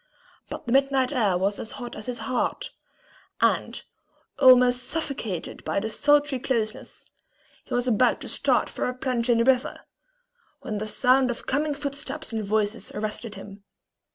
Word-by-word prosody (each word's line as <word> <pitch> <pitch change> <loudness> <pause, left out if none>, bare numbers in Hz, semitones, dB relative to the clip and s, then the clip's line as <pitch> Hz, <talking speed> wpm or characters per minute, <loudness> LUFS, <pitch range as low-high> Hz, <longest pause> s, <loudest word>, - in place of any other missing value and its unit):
But - - -7
the 235 - -3
night 270 -1 +3
air 215 -9 +2
was 195 +2 -1
as 225 - -6
hot 245 -2 -7
as 215 +2 -8
his 250 -1 -3
heart; 255 - -2 0.7
and, - - +1 0.6
almost 250 -2 +6
suffocated 260 - -4
by - - -1
the 220 +2 -4
sultry 290 +1 +2
closeness, 225 -4 -3 0.6
he - - -3
was 245 +1 0
about 245 +1 +3
to - - -7
start - - +1
for - - -3
a 250 - -2
plunge 255 -2 -1
in 235 - +4
the 230 - +3
river, 255 0 +1 0.8
when 210 -1 -4
the 215 - -4
sound 255 +4 +3
of 240 - -5
coming 290 +2 0
footsteps 285 0 -5
and 220 -1 -2
voices 210 +2 -1
arrested 215 +1 -4
him. 195 +1 -11
245 Hz, 160 wpm, -25 LUFS, 215-265 Hz, 0.8 s, almost